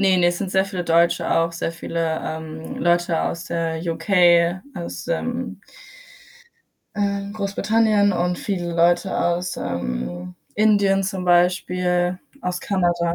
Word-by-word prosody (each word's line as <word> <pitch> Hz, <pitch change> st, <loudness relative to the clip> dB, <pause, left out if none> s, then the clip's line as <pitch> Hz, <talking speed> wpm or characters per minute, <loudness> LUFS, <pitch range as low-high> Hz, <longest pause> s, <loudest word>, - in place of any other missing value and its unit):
Ne, 190 Hz, -2 st, +4 dB
ne, 175 Hz, -1 st, +4 dB
es 175 Hz, -, -2 dB
sind 195 Hz, -, -3 dB
sehr 190 Hz, 0 st, +3 dB
viele 185 Hz, -3 st, -4 dB
Deutsche 170 Hz, +1 st, +2 dB
auch. 165 Hz, 0 st, +2 dB
Sehr 165 Hz, 0 st, -3 dB
viele, 165 Hz, -1 st, -2 dB
ähm, 160 Hz, 0 st, -6 dB
Leute 175 Hz, -1 st, +1 dB
aus 170 Hz, 0 st, -3 dB
der 165 Hz, -1 st, -2 dB
UK, 170 Hz, +1 st, +3 dB, 0.2 s
aus, 175 Hz, 0 st, -6 dB
ähm 245 Hz, +9 st, -3 dB, 1.3 s
äh, 200 Hz, 0 st, -1 dB
Großbritannien 210 Hz, 0 st, +2 dB
und 180 Hz, 0 st, -1 dB
viele 175 Hz, -4 st, -3 dB
Leute 175 Hz, +2 st, +2 dB
aus, 175 Hz, +1 st, -1 dB
ähm, 85 Hz, +3 st, -4 dB, 0.2 s
Indien 200 Hz, -2 st, +3 dB
zum 190 Hz, -1 st, -3 dB
Beispiel, 180 Hz, 0 st, +2 dB, 0.2 s
aus 180 Hz, 0 st, -2 dB
Kanada. 175 Hz, -3 st, 0 dB
175 Hz, 130 wpm, -22 LUFS, 170-195 Hz, 1.3 s, Ne